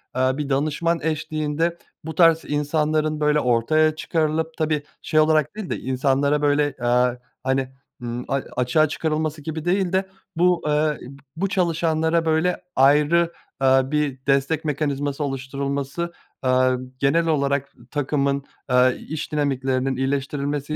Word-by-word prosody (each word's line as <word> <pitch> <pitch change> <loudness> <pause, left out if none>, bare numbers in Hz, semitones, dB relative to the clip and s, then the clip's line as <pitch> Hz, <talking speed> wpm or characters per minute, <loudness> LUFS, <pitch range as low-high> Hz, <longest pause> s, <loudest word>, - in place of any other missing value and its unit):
eee, 130 0 +2
bir 145 -1 -3
danışman 155 +4 0
eşliğinde 155 +1 -1 0.3
bu 160 -1 -5
tarz 165 -1 +5
insanların, 155 +1 0
böyle, 150 0 +3
ortaya 155 +6 +2
çıkarılıp, 160 0 -1
tabii, 155 -2 0 0.2
şey 155 - +1
olarak 155 +2 +3
değil 215 -4 -6
de - - -2
insanlara, 135 +3 +1
böyle, 145 -1 +2
eee, 125 0 +2 0.2
hani, 130 0 0 0.3
ımm, 120 0 -4
a - - -2 0.2
açığa 155 +5 +3
çıkarılması 155 0 -2
gibi 160 +1 -5
değil 185 0 +1
de 190 0 +1 0.3
bu 175 0 +2
eee, 150 0 +1 0.4
bu 195 +3 -1
çalışanlara, 165 -3 +1
böyle, 160 +3 +1
ayrı, 150 +5 +4 0.3
eee, 135 0 +5
bir 145 -2 -1
destek 140 +3 +1
mekanizması 145 -1 -1
oluşturulması, 140 +4 -3 0.3
eee, 130 - +2 0.5
genel 165 +5 +2
olarak 140 -2 0 0.2
takımın, 140 -1 0 0.3
eee, 125 0 +4
iş 155 -1 -4
dinamiklerinin 135 -2 0
iyileştirilmesi 140 +2 -2
150 Hz, 130 wpm, -23 LUFS, 135-160 Hz, 0.5 s, tarz